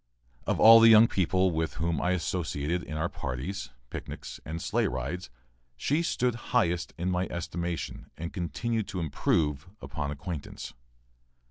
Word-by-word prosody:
Of - - +1
all 115 +1 +10
the 115 0 +8
young 110 +1 +9
people 95 -1 +2
with 80 0 -2
whom 85 0 -1
I 90 - +1
associated 85 -2 -1
in 75 -3 -6
our 80 +3 0
parties, 70 +4 -4 0.2
picnics, - - -7
and 80 +2 -5
sleigh - - +1
rides, 65 +5 -4 0.5
she 150 +4 +1
stood 125 -7 +1 0.2
highest 90 -6 +1
in 90 +2 -1
my 90 +1 0
estimation 85 0 -4
and 85 +2 -5
continued 110 +4 -2
to 95 - -4
improve 75 -1 0
upon 75 -3 -4
acquaintance. 75 +1 -6
85 Hz, 145 wpm, -29 LUFS, 80-95 Hz, 0.5 s, all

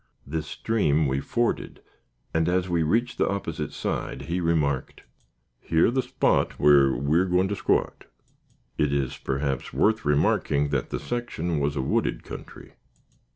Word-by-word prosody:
This 80 +2 -4
stream 80 -7 +1
we 65 0 0
forded, 120 - -2 0.5
and, 80 +1 +2
as 90 0 +1
we 85 -2 +1
reached 115 +10 0
the - - +2
opposite 100 0 -3
side, - - -4
he 90 +2 -2
remarked: 75 -5 0 0.7
"Yer' 80 +7 +4
the 130 +1 +1
spot - - +1
whar 70 -3 +5
we're 75 +8 +2
goin' 90 +1 +2
to 100 - -1
squat." - - 0 0.7
It 75 -2 +2
is 70 -2 -1
perhaps 70 -1 -2
worth 110 +1 +2
remarking 75 0 +2
that 70 -3 -1
the - - -3
section 90 -10 -3
was 70 0 0
a 65 - -1
wooded - - 0
country. - - -10
80 Hz, 150 wpm, -25 LUFS, 70-95 Hz, 0.7 s, whar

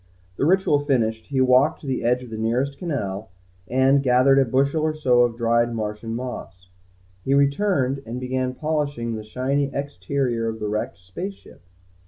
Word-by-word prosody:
The 140 - +1
ritual 185 -5 +3
finished, 115 -6 0
he 135 -2 0
walked 130 +5 +4
to - - -11
the 130 -3 -2
edge 125 +2 +1
of 120 - -11
the 110 - -5
nearest 125 +5 -1
canal, 110 - -3 0.4
and 130 +2 +3
gathered 130 +1 +4
a 135 - +4
bushel 140 +5 +1
or 155 0 0
so 125 -5 +3
of 120 -1 +1
dried 115 0 +1
Martian 110 +1 -4
moss. 105 -7 -7 0.5
He 135 - +2
returned 140 -1 +1
and 120 +2 -4
began 130 0 -2
polishing 145 -7 -2
the 110 -1 -5
shiny 135 +5 -1
exterior 130 -2 -2
of 110 0 -4
the 105 -1 -3
wrecked 105 -5 -3
space 95 - -7
ship. - - -18
130 Hz, 175 wpm, -23 LUFS, 115-140 Hz, 0.5 s, walked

